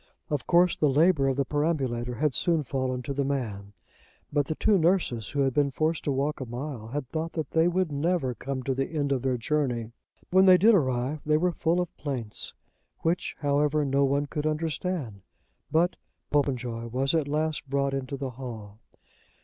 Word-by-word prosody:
Of 145 -3 -2
course 175 +1 +4
the 150 - +2
labour 150 0 +4
of 135 -1 0
the 140 - +1
perambulator 130 -5 -1
had 145 +3 +1
soon 165 +3 +1
fallen 130 -2 -2
to 140 - -3
the 140 +1 0
man; 110 -8 -3 0.6
but 145 -2 +2
the 155 - -2
two 205 +2 +3
nurses, 160 - +1
who 145 - -1
had 135 -1 +2
been 145 0 +2
forced 155 +4 -1
to 145 - +1
walk 140 +2 -1
a - - -3
mile, 120 -1 -5
had 135 +2 -4
thought 160 +1 -3
that 160 -2 -4
they 160 +1 +4
would 180 -2 0
never 145 -2 0
come 130 +3 -5
to 135 - 0
the 135 +1 -1
end 145 -3 -1
of 135 -2 +1
their 130 -1 0
journey. 120 -3 -1 0.4
When 190 +1 +6
they 185 -1 +9
did 220 +5 +6
arrive 130 - +1
they 150 0 +3
were 180 +3 +2
full 170 +1 0
of 180 0 -3
plaints, 125 -7 -4 0.5
which, 170 +2 -1
however, 145 +1 +2
no 140 +1 +2
one 140 +1 +2
could 150 +1 -3
understand. 155 - -2 0.5
But 170 +3 +2 0.3
Popenjoy 125 -5 0
was 130 +4 0
at 160 -3 +1
last 150 -1 -1
brought 140 0 0
into 135 0 -3
the 135 -1 -4
hall. 110 -5 -8
140 Hz, 190 wpm, -27 LUFS, 130-155 Hz, 0.6 s, they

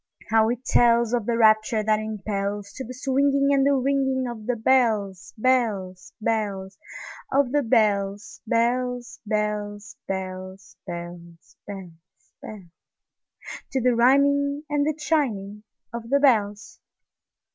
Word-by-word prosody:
how 220 0 +4
it 245 +1 -3
tellsOf 235 -1 +3
the 235 -1 +1
rapture 215 -1 +3
that 215 0 +2
impelsTo 205 +1 -4
the - - -8
swinging 275 +2 +1
and 275 -1 +3
the - - +4
ringingOf 260 -4 0
the 250 - +1
bells, 220 -6 +1
bells, 215 -7 0
bells, 205 -4 -2 0.5
Of 270 -2 +2
the 290 +1 +2
bells, 205 -4 0
bells, 245 +1 -1
bells, 210 -1 -3
bells, 185 0 -6
Bells, 170 -1 -9
bells, 180 -4 -12
bells—To 200 +6 -10
the 250 0 +2
rhyming 280 +4 +3
and 290 0 +1
the 310 - 0
chiming 215 -11 -1 0.3
of 235 -1 -6
the 280 +2 +3
bells! 215 -6 +1
220 Hz, 115 wpm, -24 LUFS, 200-255 Hz, 0.5 s, how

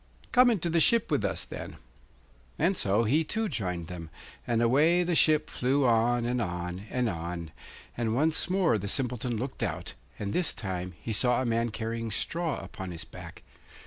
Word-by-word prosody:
'Come 250 0 +6
into 195 -8 +1
the 165 0 +2
ship 230 +2 +4
with 145 -8 +2
us, 100 - -1
then.' - - -7 0.8
And 175 +5 +2
so 105 - +2
he 145 +9 +3
too 220 +7 -1
joined 90 - -3
them; 85 -1 -7 0.4
and 115 -1 +1
away 150 +9 +4
the 175 0 0
ship 155 -1 +4
flew 135 +2 +1
on, 120 0 +3
and 120 0 0
on, 90 +1 -4
and 125 -1 0
on, 85 -3 -4 0.4
and 115 -2 -1
once 155 +6 +2
more 180 - +2
the 100 - -4
Simpleton 125 0 -1
looked 130 +4 -5
out, - - -3 0.2
and 100 -1 -3
this 180 -3 +1
time 90 -3 -4
he 115 - -4
saw 125 +3 +2
a 130 - 0
man 115 0 +1
carrying 115 +1 -3
straw 165 +8 -1
upon 95 -5 -7
his 85 -2 -6
back. - - -11
120 Hz, 180 wpm, -29 LUFS, 100-155 Hz, 0.8 s, Come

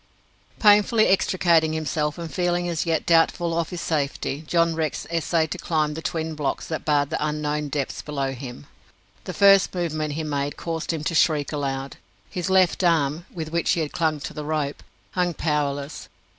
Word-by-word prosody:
Painfully 210 +1 +5
extricating 170 -4 +3
himself, 150 -1 -1
and 165 -2 -6
feeling 175 -1 0
as 170 -1 -2
yet 160 -2 0
doubtful 165 0 +3
of 170 -1 -1
his 180 -2 -5
safety, 145 -1 -2
John 170 0 +2
Rex 160 -2 -2
essayed 165 -1 0
to 185 - -4
climb 155 -3 0
the 160 - -6
twin 160 -1 -3
blocks 145 -3 -2
that 160 - -4
barred 145 -1 +1
the - - -1
unknown 150 0 -1
depths 140 -1 -3
below 140 -3 -2
him. 125 - -8 0.6
The - - -5
first 195 -1 +5
movement 155 -4 -2
he 160 +2 -3
made 145 -1 -2
caused 165 -1 -3
him 160 -2 -4
to 165 - -1
shriek 155 -3 +2
aloud. 140 -2 -3 0.3
His 180 0 -3
left 190 0 +3
arm 165 -1 +1
with 160 -3 -6
which 170 0 0
he 160 -3 0
clung 160 -2 0
to - - -6
the 150 - -5
rope 150 -2 -2 0.3
hung 180 -2 0
powerless. 145 -2 -2
160 Hz, 175 wpm, -24 LUFS, 150-170 Hz, 0.6 s, Painfully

